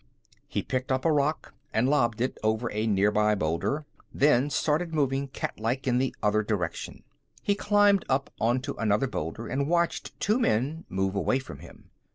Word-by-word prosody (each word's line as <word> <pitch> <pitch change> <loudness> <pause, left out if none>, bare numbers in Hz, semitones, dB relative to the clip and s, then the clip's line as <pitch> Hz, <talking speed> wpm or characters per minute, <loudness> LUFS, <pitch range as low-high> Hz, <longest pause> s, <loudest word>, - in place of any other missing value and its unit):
He - - -2
picked 130 0 -2
up 130 +2 0
a 165 - +4
rock 150 +1 0 0.2
and 115 +3 +2
lobbed 120 -6 +2
it 130 - -1
over 110 +2 0
a 110 +1 -1
nearby 105 +1 +3
boulder, 85 - -1 0.3
then 140 -1 +3
started 160 +3 0
moving 140 -1 +1
cat 135 - -5
like 120 +4 -1
in 125 -1 +2
the 130 -1 -1
other 105 +1 +3
direction. 100 -6 -3 0.4
He 200 - +2
climbed 205 -1 +3
up 135 +1 0
onto 125 +5 0
another 105 +3 +2
boulder 110 - -4
and 140 +2 -1
watched 170 0 0
two 215 +5 +2
men 150 - 0
move 95 0 -1
away 100 +6 +1
from 135 - -8
him. - - -15
130 Hz, 175 wpm, -27 LUFS, 110-150 Hz, 0.4 s, a